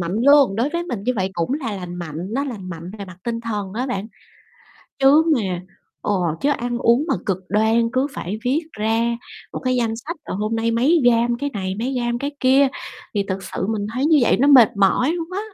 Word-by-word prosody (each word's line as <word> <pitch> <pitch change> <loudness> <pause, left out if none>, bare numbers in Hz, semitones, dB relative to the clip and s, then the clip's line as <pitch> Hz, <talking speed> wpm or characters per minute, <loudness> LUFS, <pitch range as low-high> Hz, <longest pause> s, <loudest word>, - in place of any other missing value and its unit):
mạnh 175 +4 -2
luôn, 280 -8 +6
đối 240 +5 +1
với 340 +3 -2
mình 235 - -5
như 250 - +1
vậy 190 0 -1
cũng 170 +9 -1
là 255 -8 -3
lành 180 -2 -7
mạnh, 170 -4 -6 0.2
nó 275 +3 0
lành 210 -9 -6
mạnh 170 +2 -7
về 200 - -5
mặt 185 -2 -12
tinh 230 -1 -2
thần 205 -4 -4
á 250 +4 -2
bạn. 205 -5 -3 0.9
Chứ 280 +4 +6
mà 185 -6 -2 0.4
ừ, - - 0 0.3
chứ 290 - +2
ăn 240 -3 -2
uống 240 +4 +3
mà - - +2
cực 190 -2 0
đoan 220 +3 +2
cứ 260 +2 +1
phải 210 -5 -5
viết 265 +5 +2
ra 225 +2 0 0.4
một - - -4
cái 255 0 +1
danh 230 -2 0
sách, 315 +9 -6
à, - - -5
hôm 215 +2 -1
nay 225 +1 0
mấy 270 +9 +3
gam 235 0 +3
cái 285 +2 -2
này 190 -2 -3
mấy 250 +4 -2
gam 240 -1 -1
cái 280 +2 -3
kia, 265 +1 +5 0.5
thì 205 - +1
thực 190 0 -3
sự 190 - -4
mình 210 -2 -2
thấy 255 +4 0
như 310 -1 +5
vậy - - +4
nó 280 +4 +3
mệt 245 -7 +7
mỏi 200 +9 +3
luôn 335 0 -4
quá. 390 - -2
235 Hz, 230 wpm, -21 LUFS, 200-265 Hz, 0.9 s, mệt